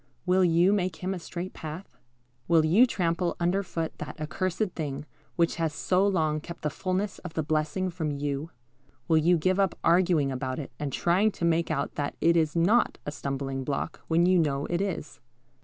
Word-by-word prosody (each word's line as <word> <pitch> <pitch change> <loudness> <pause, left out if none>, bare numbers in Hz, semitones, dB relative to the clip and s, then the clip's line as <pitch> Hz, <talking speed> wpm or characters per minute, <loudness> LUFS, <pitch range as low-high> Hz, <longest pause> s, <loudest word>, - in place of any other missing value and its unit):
Will 185 0 +3
you 175 +3 +4
make 185 -4 0
Him 185 +3 -3
a 185 - -5
straight 175 +2 -6
path? 160 +5 -8 0.5
Will 165 -2 +4
you 205 +11 +5
trample 175 -4 0
under 175 +3 +1
foot 165 -4 -4
that - - -7
accursed 185 +6 -2
thing 145 -2 -4 0.3
which 170 -1 +1
has 160 -3 -1
so 185 +5 +2
long 155 -6 +1
kept 170 +2 -10
the 150 - 0
fulness 185 +5 -2
of 170 -3 -9
the 160 - 0
blessing 155 +4 -1
from 165 -3 -3
you? 145 +1 -3 0.6
Will 160 -1 +4
you 170 +3 +4
give 185 +4 +1
up 195 -2 +1
arguing 170 -4 +3
about 130 0 -3
it 145 - -6
and 145 -2 -3
trying 185 +9 +2
to 170 - -2
make 170 0 +2
out 145 -3 -1
that 145 -1 -2
it 170 +1 +4
is 160 -2 +2
not 195 +9 +3
a 145 - -3
stumbling 135 -2 -3
block, 140 +4 -3
when 170 +1 +3
you 185 0 +4
know 145 -3 0
it 175 +1 +1
is? 190 -6 -4
170 Hz, 195 wpm, -27 LUFS, 150-185 Hz, 0.6 s, you